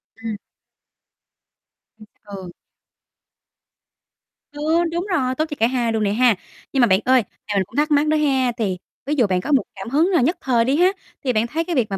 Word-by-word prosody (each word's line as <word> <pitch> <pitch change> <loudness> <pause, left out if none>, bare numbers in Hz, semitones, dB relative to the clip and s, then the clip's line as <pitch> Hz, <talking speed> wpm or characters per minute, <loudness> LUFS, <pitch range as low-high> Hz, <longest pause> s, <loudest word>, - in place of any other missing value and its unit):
Ừm. 225 -1 -5 1.6
Ừm, 215 - -13 0.2
ừ. 195 -3 -8 2.0
Ừ, 310 +4 +1
đúng 345 +2 -2
rồi, 260 -7 0
tốt 310 - 0
cho 295 - -4
cả 225 - +4
hai 240 -2 0
luôn 220 -1 0
nè 200 - +1
ha. 240 0 +4 0.4
Nhưng 270 - +3
mà 240 - +6
bạn 190 -2 +4
ơi, 255 -2 +4 0.2
thì 210 - -2
mình 195 - +2
cũng - - -17
thắc 300 +1 +1
mắc 295 +1 +3
đó 310 0 +2
ha, 265 -4 +2
thì 195 -5 -1 0.3
ví 290 - -1
dụ 235 -6 +4
bạn 185 -1 0
có 300 - -4
một 275 - +4
cảm 195 +3 -7
hứng 310 +8 +2
là 345 - +3
nhất 315 +9 +1
thời 240 -3 +2
đi 265 +3 +2
ha, 360 +4 +4 0.3
thì 255 -2 0
bạn 220 +1 +1
thấy 320 +7 -2
cái 340 0 -3
việc 245 -5 +2
mà 195 - -2
255 Hz, 215 wpm, -21 LUFS, 220-300 Hz, 2.0 s, mà